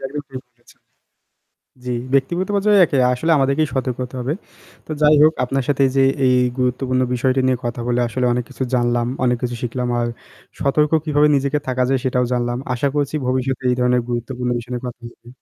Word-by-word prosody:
এটা - - -9
একদম 145 +2 -5
ঠিক 130 -1 -6
বলেছেন। 120 0 -24 1.0
জি, 125 - -2 0.2
ব্যক্তিগত 170 +7 +1
পর্যায়ে 205 0 +3
একে 140 - -1
আসলে 140 +7 -1
আমাদেরকেই 140 +3 +1
সতর্ক 130 -2 -1
হতে 125 +1 -11
হবে। 125 +4 -1 0.5
তো - - -12
যাই 150 0 +6
হোক 155 +1 +6
আপনার 135 +1 -2
সাথে 140 -1 +1
এই 130 - -5
যে 135 - +5 0.2
এই 125 0 +4 0.2
গুরুত্বপূর্ণ 130 0 0
বিষয়টি 130 +1 +1
নিয়ে 130 -1 +1
কথা 120 0 -3
বলে 120 0 +1
আসলে 125 +2 -1
অনেক 125 0 -1
কিছু 130 0 -6
জানলাম, 120 -1 +1 0.2
অনেক 125 -1 +2
কিছু 120 -1 -2
শিখলাম। 125 +1 -2
আর 120 - 0 0.5
সতর্ক 150 +2 +1
কিভাবে 150 -1 +3
নিজেকে 140 +2 0
থাকা 130 0 0
যায় 135 0 +2
সেটাও 125 -1 +1
জানলাম। 120 0 -1 0.2
আশা 130 +3 0
করেছি 145 0 -1
ভবিষ্যতে 130 0 -1
এই - - +2
ধরণের 125 0 +2
গুরুত্বপূর্ণ 125 +1 -3
বিষয় 120 +1 -10
নিয়ে 125 +1 -5
কথা 120 -1 -7
হবে। 120 - -20
130 Hz, 200 wpm, -20 LUFS, 125-140 Hz, 1.0 s, যাই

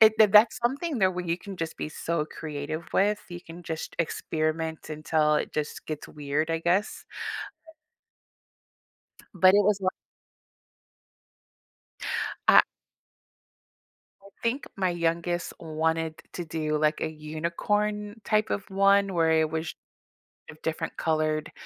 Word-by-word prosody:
it 220 0 +9
th 215 -2 +7
that's 215 +4 +7
something 280 +4 0
that 190 -2 +4
where 180 0 -3
you 170 0 0
can 195 0 -9
just 165 -1 -4
be - - -3
so 160 +1 -2
creative 155 +1 -5
with. 205 +1 +3
You 175 0 -7
can 175 0 -11
just 160 -1 -5
experiment 160 -1 -2
until 155 0 +2
it - - -1
just 150 -1 -3
gets 155 -1 -5
weird, 150 +2 -2
I 165 - +1
guess. 180 +5 0 2.3
But 185 0 +7
it 205 -1 +5
was 210 -1 +3
wa 185 - +2 2.6
I - - +9 1.6
I - - -13 0.2
think 240 +5 0
my 190 -2 +1
youngest 170 0 -1
wanted 160 0 -1
to 175 - -4
do, 155 -1 -1
like, 155 +1 +1
a 160 - 0
unicorn 205 +8 -2
type 215 +1 +2
of 200 - -3
one 200 0 +4
where 165 -2 +3
it 160 -1 +3
was 160 +1 -3 0.8
of 155 - -12
different 160 0 -3
colored 155 -1 0
165 Hz, 135 wpm, -27 LUFS, 155-195 Hz, 2.6 s, it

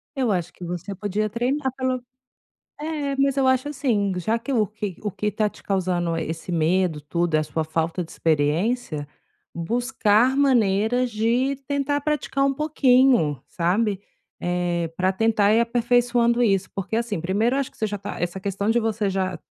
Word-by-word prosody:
Eu 255 -5 +1
acho 180 -4 -1
que - - -12
você 180 +3 -5
podia 205 +2 -2
treinar 260 +5 -1
pelo 255 -1 -1 0.8
é, 300 -3 -2
mas 275 0 +2
eu 270 - +2
acho, 260 +2 +2
assim, 235 -9 0
já 220 +6 0
que 255 +4 -5
o 225 -4 +3
que 205 -3 -6
o 210 - -2
que 210 +2 -2
tá 210 +1 +1
te - - -18
causando 175 -3 0
esse 165 +2 -4
medo, 170 0 +1
tudo, 170 +3 -1
é - - +5
a - - 0
sua 160 +1 -2
falta 165 +3 -1
de 160 - -15
experiência, 155 +3 0 0.5
buscar 240 +5 +2
maneiras 245 -2 +2
de 240 +5 +1
tentar 285 0 0
praticar 290 -2 0
um 275 0 +2
pouquinho, 255 - +3
sabe. 195 +3 0 0.4
Eh, 175 -1 -1
pra 185 +1 +2
tentar 210 0 +3
ir 225 - +4
aperfeiçoando 240 0 +2
isso. 195 -5 +2
Porque, 195 +2 -4
assim, 225 -6 -1
primeiro 210 +9 +1
eu - - +2
acho 275 - -4
que - - -25
você 220 - -1
já 205 - -4
tá 200 - -7
essa 175 +2 -2
questão 200 +2 -1
de 235 - +3
você 220 -3 0
já 190 -1 -1
210 Hz, 180 wpm, -23 LUFS, 180-250 Hz, 0.8 s, é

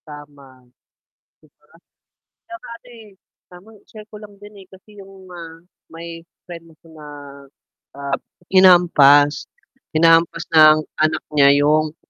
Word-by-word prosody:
Tama 145 -4 -16 0.8
'di 155 - -25
ba. - - -35 0.8
'Tsaka 345 0 -13
ano - - -25
eh, 225 -2 -16 0.4
tamang 195 +5 -18
i-share 215 -1 -16
ko 210 - -12
lang 210 -1 -16
din 205 +1 -16
eh, - - -25
kasi 200 +2 -20
yung 195 -1 -17
ah 165 -2 -12 0.3
may 165 0 -12 0.2
friend 165 -2 -14
ako 160 - -37
na, 155 -1 -15 0.9
ah, 140 -1 -5 0.3
hinampas. 155 -6 +3 0.5
Hinahampas 165 +1 +1
ng 155 -1 +5 0.2
anak 155 0 -1
niya 140 -2 +3
yung 155 +1 -1
165 Hz, 130 wpm, -17 LUFS, 150-190 Hz, 0.9 s, ng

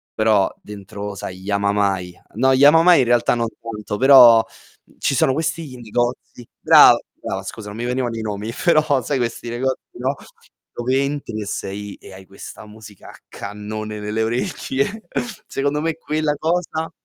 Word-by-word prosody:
però 110 -3 +2
dentro, 100 0 -8
sai, 90 -1 -7
Yamamai 100 -2 -1 0.2
no 130 +4 +3
Yamamai 165 +5 +6
in 130 - +3
realtà 120 0 +2
non 115 -1 -1
tanto, 105 -2 -6
però, 125 -3 +7 0.4
mhmm, - - -26
ci 140 - 0
sono 130 - +2
questi 160 -2 -3
negozi 120 +1 -3
brava, - - +7 0.2
brava 95 - -5
scusa 105 +1 -8
non 105 - -9
mi 120 - -4
venivano 125 -1 -2
i 115 - -4
nomi, 105 +1 -4
però 155 -6 +3
sai 140 +3 -2
questi 120 -1 -3
negozi, 130 +2 -2
no, 130 +3 -2 0.6
dove 130 +3 0
entri 140 -4 -4
che 105 - -5
sei 100 0 -5
e - - -14
hai 95 0 -13
questa 100 +2 -11
musica 105 -2 -14
a - - -13
cannone 105 +1 -7
nelle 105 +1 -3
orecchie. 135 - -2 0.5
Secondo 145 +2 -1
me 165 -1 -1
quella 155 -1 -1
cosa, 160 0 -2
120 Hz, 160 wpm, -20 LUFS, 105-140 Hz, 0.6 s, però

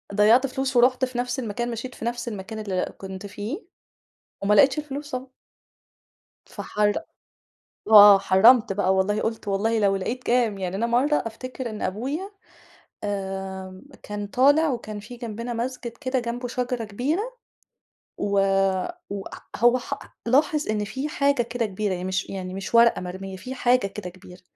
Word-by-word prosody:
ضيّعت 225 +6 +5
فلوس 265 0 -3
ورُحت 250 +2 +4
في 255 -1 -8
نفْس 245 +2 -1
المكان، 240 +1 -3
مشيت 235 +2 -6
في - - -7
نفْس 240 0 -3
المكان 215 0 -6
اللي 190 -4 -2
كنت 190 0 -8
فيه، 210 - -5 0.8
وما 205 +1 +3
لقيتش 265 +8 +5
الفلوس 295 0 -5
طبعًا. 255 0 -5 1.1
فحر 210 0 -1 0.9
آه 205 -2 +9
حرّمت 215 +3 +5
بقى 190 -1 +1
والله، 200 +2 +1
قُلت 225 -1 -3
والله 220 +3 +1
لو 200 -2 +3
لقيت 235 +7 -3
كام، 235 -4 +1
يعني 185 -1 -3
أنا 225 +4 0
مرَّة 255 +6 +2
أفتكِر 255 +2 -6
إن 215 - -7
أبويا 275 - -3 0.8
آمم، 190 -2 -5 0.2
كان 205 0 -5
طالِع 285 +8 +4
وكان 215 -4 -5
في 230 +4 -10
جنبنا 235 0 -5
مسجد 245 +1 -4
كده 260 -2 0
جنبه 245 +1 -4
شجرة 250 -1 -2
كبيرة 250 - -1 1.0
و 205 - -2 0.8
وأ 200 -1 -5
أ - - -13 0.2
هو 240 +2 +4
حأ 250 - -5 0.3
لاحظ 300 +5 +2
إن 210 -1 0
في 265 +8 -4
حاجة 280 -3 +2
كده 235 0 -2
كبيرة، 205 0 -2
يعني 180 0 -4
مش 190 +1 -2
يعني 185 -1 -5
مش 195 +4 -6
ورقة 235 0 +6
مرميّة، 190 +1 -6
في 255 +8 -7
حاجة 250 -3 +2
كده 195 -2 -7
كبيرة، 180 0 -15
225 Hz, 160 wpm, -24 LUFS, 200-255 Hz, 1.1 s, آه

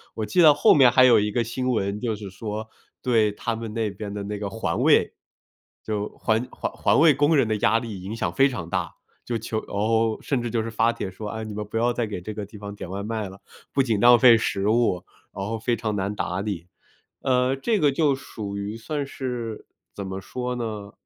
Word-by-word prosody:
我 110 - -2
记 140 +12 +2
得 150 -3 +8
后 145 - +6
面 130 -4 +6
还 130 - +6
有 125 - +6
一 105 0 0
个 120 +2 +1
新 125 +3 -3
闻 100 -3 -1
就 115 -2 -1
是 100 -2 -8
说， 105 +2 -5 0.4
对 110 -4 +3
他 115 +2 -3
们 115 -1 -6
那 110 -2 -1
边 100 +1 -7
的 100 0 -5
那 105 0 -5
个 100 - -3
环 95 -6 -2
卫， - - +4 0.7
就 105 -1 -2
环 115 +3 0
环 - - -4
环 - - +2
卫 160 -1 +7
工 145 +3 +3
人 130 - +3
的 110 -1 0
压 105 +2 +3
力 110 -5 -5
影 100 +4 -5
响 - - -2
非 135 0 +4
常 115 -11 -5
大， 90 -2 -1 0.3
就 120 - -2
求 110 0 -3
哦， 110 +2 +1
甚 135 -4 0
至 120 - -3
就 115 0 0
是 115 - -5
发 115 +1 +2
帖 100 -4 -5
说： 105 +3 -7
“啊， 110 +1 -5
你 110 -1 -6
们 105 - -4
不 105 +2 -5
要 120 +2 +2
再 120 -1 -1
给 105 -3 -5
这 110 +5 -6
个 105 0 -5
地 105 - -12
方 100 0 -7
点 100 -3 -8
外 100 +2 -4
卖 110 -2 -3
了。 95 +1 -13 0.3
不 135 - +2
仅 115 -5 0
浪 120 +2 +7
费 120 0 +8
食 100 -3 -1
物， 110 -5 +2 0.3
然 95 0 -5
后 110 +2 -3
非 120 +2 0
常 110 -1 -3
难 100 +1 -2
打 90 -1 -2
理。” 100 -5 -4 0.6
呃， 130 0 +2
这 210 - 0
个 150 - +4
就 145 0 +2
属 105 -6 -7
于 100 +2 -4
算 140 +5 -4
是 120 -5 -5 0.3
怎 100 - -5
么 95 0 -5
说 125 +5 -4
呢？ 110 -4 -5
110 Hz, 255 characters per minute, -24 LUFS, 100-120 Hz, 0.7 s, 得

